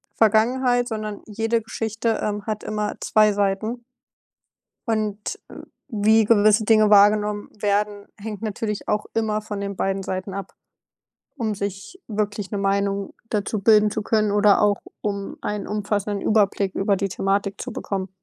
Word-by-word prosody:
Vergangenheit, 245 +3 +3
sondern 215 -3 -5
jede 225 +2 -1
Geschichte, 225 0 -2
ähm, 205 -1 -2
hat 215 -1 -3
immer 210 -1 -2
2 215 -1 +4
Seiten. 205 +4 -1 1.0
Und 215 -2 -2
w - - -10 0.3
wie 220 -1 +3
gewisse 215 0 +4
Dinge 215 -1 +5
wahrgenommen 210 0 +4
werden, 205 0 0
hängt 210 0 -7
natürlich 210 -1 -3
auch 210 0 0
immer 215 -1 0
von 210 -1 -6
den 200 -1 -4
beiden 195 0 -1
Seiten 185 +1 -4
ab. 195 -1 -6 0.8
Um 220 -5 -1
sich 200 - -6
wirklich 205 -2 -2
'ne 205 - -2
Meinung 200 0 0 0.2
dazu 210 0 -1
bilden 210 0 +5
zu 215 - -3
können 215 -1 +1
oder 205 0 +5
auch 205 -1 +3 0.2
um 200 -1 -3
einen 210 -1 -3
umfassenden 205 -1 -2
Überblick 200 -2 +2
über 200 0 +1
die 195 +1 -1
Thematik 195 +1 -1
zu 250 - -5
bekommen. 195 -3 -4
210 Hz, 150 wpm, -23 LUFS, 200-220 Hz, 1.0 s, Dinge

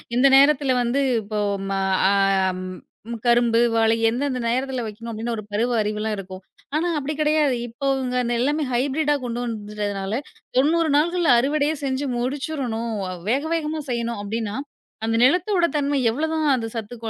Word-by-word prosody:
இந்த 265 +3 +5
நேரத்துல 280 -1 +4
வந்து, 245 +4 +1 0.2
இப்ப 210 +1 -11 0.2
ஓ - - 0
ஆ - - -6
மா 195 0 -1 0.3
ஆ - - +3 0.5
ம். 185 0 -7 0.4
கரும்பு, 235 -1 +4 0.2
வாழை 225 0 +3
எந்தெந்த 255 +2 -1
நேரத்துல 255 0 -1
வைக்கணும் 225 +2 -7
அப்பிடின்னு 230 +1 -3
ஒரு 215 - -5
பருவ 235 +4 +1
அறிவு 210 0 -2
எல்லாம் 220 -1 -1
இருக்கும். 190 -1 -8 0.3
ஆனா 330 +3 +1
அப்பிடி 295 +1 -2
கிடையாது. 300 -3 +2
இப்பவுங்க 265 0 -2 0.2
எல்லாமே 290 +5 +1
ஹைபிரிட்டா 285 +4 +1
கொண்டு 240 0 -3
வந்துட்டதுனால, 205 -2 -4 0.4
90 320 +4 +3
நாள்கள்ல 340 -1 +2
அறுவடையே 290 +4 +1
செஞ்சு 265 +1 -1
முடிச்சுரனும். 250 -4 -3 0.2
அ - - -4 0.2
வேக 275 +4 +1
வேகமா 315 -1 -2
செய்யணும், 235 -2 -2
அப்பிடின்னா 215 0 -3 0.5
அந்த 225 0 0
நிலத்தோட 350 +6 +3
தன்மை 285 -1 +1
எவ்ளோ 300 +8 -1
தான் 315 -1 0
அந்தச் 225 -3 -2
சத்து 225 +1 -5
250 Hz, 160 wpm, -23 LUFS, 225-290 Hz, 0.5 s, இந்த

